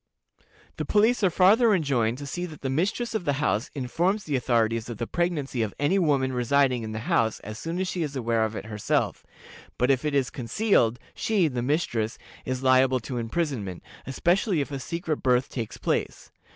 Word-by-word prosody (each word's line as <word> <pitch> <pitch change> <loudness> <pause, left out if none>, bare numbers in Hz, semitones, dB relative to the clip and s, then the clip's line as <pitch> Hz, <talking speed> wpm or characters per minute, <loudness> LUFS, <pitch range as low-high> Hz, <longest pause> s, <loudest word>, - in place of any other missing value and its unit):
The - - -2
police 220 +2 +2
are 190 - +5
farther 205 +6 +5
enjoined 125 -8 +1
to 145 - -7
see 175 +6 -4
that 155 -3 -12
the 135 - -2
mistress 205 - -1
of 220 - -1
the 145 - +1
house 135 -4 0
informs 175 - 0
the 150 -5 -2
authorities 115 -2 +1
of 120 - -5
the 115 - -2
pregnancy 155 -6 -1
of 110 -3 -2
any 165 +7 +2
woman 140 -6 +1
residing 130 0 +2
in 110 -1 -5
the 110 0 -4
house 110 -2 +1
as 110 +2 -8
soon 165 +2 -4
as 190 - -1
she 180 -1 -3
is 145 -3 -3
aware 115 -3 +1
of 110 0 -2
it - - -5
herself, 105 -1 -1 0.5
but 125 +2 +3
if 130 0 +1
it 150 -2 -1
is 135 -2 +1
concealed 125 - +1 0.2
she 205 -6 +1
(the 125 -4 -2
mistress) 120 -5 -1 0.3
is 130 0 -3
liable 130 0 +4
to 125 +2 -4
imprisonment, 115 - -3 0.2
especially 175 - +1
if 145 0 -2
a 140 - -3
secret 165 +1 -3
birth 125 0 +1
takes 115 -4 -5
place. - - -2
135 Hz, 195 wpm, -26 LUFS, 120-170 Hz, 0.5 s, are